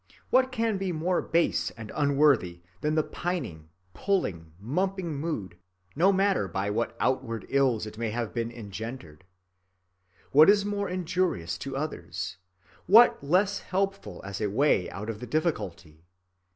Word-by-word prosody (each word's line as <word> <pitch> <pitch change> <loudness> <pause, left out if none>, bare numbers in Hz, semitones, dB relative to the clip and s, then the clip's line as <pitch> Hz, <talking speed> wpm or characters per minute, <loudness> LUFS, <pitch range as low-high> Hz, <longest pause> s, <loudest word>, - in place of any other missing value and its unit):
What 260 0 +4
can 225 -4 0
be 190 -1 -1
more 175 +2 0
base 165 - +1
and 110 -2 -8
unworthy 140 - +2 0.2
than 150 +6 0
the 155 - +3
pining, 120 - -4 0.2
puling, 90 - -1
mumping 180 - -2
mood, 140 - -4 0.4
no 185 +6 +5
matter 195 - +2
by 95 +3 -2
what 115 +3 -2
outward 125 -4 -1
ills 130 -6 +2
it 105 +1 -9
may 115 -1 -1
have 115 0 -3
been 115 -1 -2
engendered? 110 - -8 1.1
What 155 +6 +8
is 205 0 +5
more 205 -1 -2
injurious 180 - -1
to 135 -1 -5
others? 150 - -4 0.5
What 220 -3 +7
less 190 +7 +2
helpful 195 - -3
as 100 +1 -5
a 105 - 0
way 110 -4 +2
out 105 +5 -5
of 105 - -9
the 125 - -7
difficulty? 95 - -3
140 Hz, 145 wpm, -28 LUFS, -, 1.1 s, What